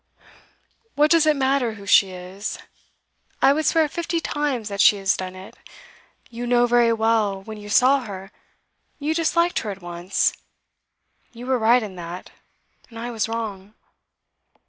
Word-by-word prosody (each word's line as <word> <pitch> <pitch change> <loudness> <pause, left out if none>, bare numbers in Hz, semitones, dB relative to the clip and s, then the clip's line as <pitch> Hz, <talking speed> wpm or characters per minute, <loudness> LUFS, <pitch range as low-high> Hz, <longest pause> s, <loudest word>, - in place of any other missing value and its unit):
'What 300 +1 +3
does 330 -2 +4
it 305 - +4
matter 265 -3 +1
who 200 -2 -12
she 195 0 +5
is? 185 +3 -7 0.8
I 270 +1 +5
would 310 0 -1
swear 320 -2 +3
fifty 335 +2 -3
times 290 -8 -2
that 200 -1 -1
she 210 - +6
has 195 -1 +1
done 185 0 -6
it. 185 +1 -12 0.8
You 240 +1 -5
know 245 0 +4
very 240 -1 +3
well, 220 -3 +1
when 215 +1 -9
you 205 0 -10
saw 255 +6 +4
her, 195 -6 -9 0.7
you 305 +1 -1
disliked 340 +2 +1
her 215 - -5
at 195 -2 -7
once. 175 +2 -1 1.0
You 240 +1 -10
were 260 -1 +1
right 230 +2 +4
in 195 -4 -8
that, 175 +1 -8 0.6
and 230 - -12
I 240 +1 -5
was 225 -1 -2
wrong. 215 -3 -5
230 Hz, 160 wpm, -22 LUFS, 195-270 Hz, 1.0 s, she